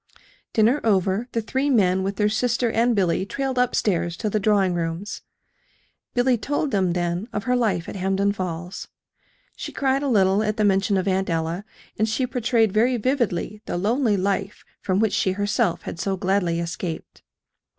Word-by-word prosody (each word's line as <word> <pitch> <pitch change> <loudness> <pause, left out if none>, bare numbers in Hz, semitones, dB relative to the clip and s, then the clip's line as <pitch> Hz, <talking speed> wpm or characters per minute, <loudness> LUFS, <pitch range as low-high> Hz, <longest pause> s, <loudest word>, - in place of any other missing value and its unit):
Dinner 230 +6 +3
over, 200 +1 +1
the 230 - -1
three 265 +6 -1
men, 190 -7 +3
with 195 +1 -2
their 210 0 +2
sister 235 +2 +1
and 235 +1 +2
Billy, 185 -3 +1
trailed 265 +5 -2
up 250 -1 +2
stairs 170 -4 0
to 215 0 -2
the 215 - +1
drawing 195 -3 +2
rooms. 170 +4 -3 0.9
Billy 245 -1 +3
told 290 +4 -1
them, 185 -3 +1
then, 175 +3 -2
of 205 - -3
her 250 0 +1
life 205 -9 0
at - - -6
Hampden 195 +1 +1
Falls. 180 -2 -5 0.7
She - - -6
cried 270 0 0
a 285 - -1
little 200 -4 +3
at 215 0 -1
the 215 - +2
mention 195 0 +2
of 185 +1 -1
Aunt 190 0 0
Ella; 165 +4 -2 0.3
and 220 +1 +2
she 240 +4 0
portrayed 240 -3 +1
very 240 +5 +2
vividly 215 -5 -1
the - - -2
lonely 220 +3 +1
life 195 +1 -2 0.2
from 190 0 0
which 220 -2 +2
she 190 - +1
herself 205 -3 0
had - - -6
so 195 +1 -1
gladly 180 -2 0
escaped. 170 0 -5
205 Hz, 180 wpm, -23 LUFS, 185-230 Hz, 0.9 s, Dinner